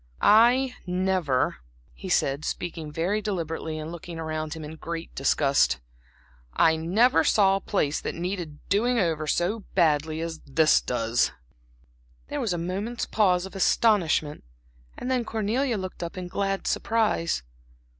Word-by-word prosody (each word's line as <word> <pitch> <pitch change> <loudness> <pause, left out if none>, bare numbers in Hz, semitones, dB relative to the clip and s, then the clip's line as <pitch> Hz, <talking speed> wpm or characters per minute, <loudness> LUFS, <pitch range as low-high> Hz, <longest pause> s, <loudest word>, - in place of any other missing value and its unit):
"I 245 +4 +5
never," 180 - 0 0.4
he - - -8
said, 140 +2 +1
speaking 165 -3 -4
very 180 +7 -1
deliberately 165 -6 -3
and 155 +1 -6
looking 170 0 -8
about 155 -1 -4
him 160 - -7
in 155 +2 -8
great 165 +1 -6
disgust, 135 - +2 0.7
"I 160 - +4
never 195 +11 +3
saw 195 -2 +4
a - - -8
place 155 -8 0
that - - -4
needed 175 -4 -5
doing 240 +5 +2
over 160 -6 0
so 180 +9 0 0.2
badly 155 -3 +2
as 165 -1 -4
this 155 +3 +3
does." 115 -1 0 1.0
There - - -3
was 220 - -1
a 175 - -1
moment's 195 +7 -3
pause 185 -4 +2
of 190 - -10
astonishment; 185 -7 +2 0.5
and 255 - -3
then 250 -2 +1
Cornelia 225 +3 -1
looked 185 -1 -6
up 170 +2 -5
in 180 -1 -5
glad 195 +1 -2
surprise. 215 - 0
175 Hz, 145 wpm, -26 LUFS, 155-205 Hz, 1.0 s, I